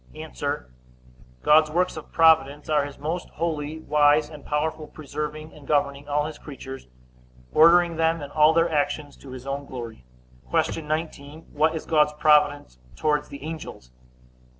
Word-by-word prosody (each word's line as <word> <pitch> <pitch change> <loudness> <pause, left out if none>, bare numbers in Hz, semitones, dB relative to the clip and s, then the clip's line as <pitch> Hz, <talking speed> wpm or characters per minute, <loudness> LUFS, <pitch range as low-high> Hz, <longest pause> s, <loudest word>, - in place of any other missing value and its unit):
A. - - -8 1.1
God's 155 0 +5
works 180 +4 0
of 155 - -10
providence 155 -3 +3
are 150 -2 +2
his 140 -1 -9
most 160 +5 -4
holy, 155 -2 -3
wise, 150 0 +3
and 150 -2 -11
powerful 155 +1 -2
preserving 150 +1 -6
and 145 -2 -15
governing 145 -1 0
all 145 +1 +1
his 155 -1 -7
creatures; 135 -2 -9 0.7
ordering 170 +1 +5
them, 165 0 +1
and 145 -1 -8
all 155 0 +5
their 165 +1 +2
actions, 145 -1 -1
to 140 - -13
his 130 0 -9
own 140 +1 -4
glory. 115 - -8 0.5
Q. 165 - 0
19. 155 -1 -5
What 155 +2 +2
is 160 - -5
God's 150 -1 +3
providence 150 - +2 0.2
towards 150 -1 0
the 140 - -10
angels? 155 - -8
150 Hz, 150 wpm, -24 LUFS, 145-160 Hz, 1.1 s, God's